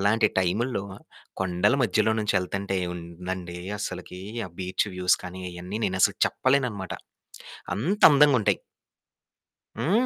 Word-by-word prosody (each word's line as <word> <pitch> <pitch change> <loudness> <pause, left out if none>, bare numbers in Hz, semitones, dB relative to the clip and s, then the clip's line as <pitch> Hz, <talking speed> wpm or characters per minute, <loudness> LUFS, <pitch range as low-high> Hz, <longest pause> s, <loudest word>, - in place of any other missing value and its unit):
అలాంటి 105 +3 +3
టైముల్లో 100 +4 0 0.6
కొండల 95 +7 +2
మధ్యలో 110 0 +2
నుంచి 105 -2 +1
ఎళ్తుంటే 95 +1 -3
ఏముందండి 90 +1 -6 0.2
అసలకి 90 -1 -6 0.3
ఆ - - -20
బీచ్ 95 +3 0
వ్యూస్ 90 0 +3
కానీ 90 +1 -7
అయన్నీ 90 +4 -6
నేనసలు 95 0 +2
చెప్పలేననమాట. 125 -8 0 0.8
అంత 180 - -1
అందంగుంటాయి. 140 -6 +4 1.2
హ్మ్. 195 - +2
95 Hz, 105 wpm, -26 LUFS, 90-115 Hz, 1.2 s, అందంగుంటాయి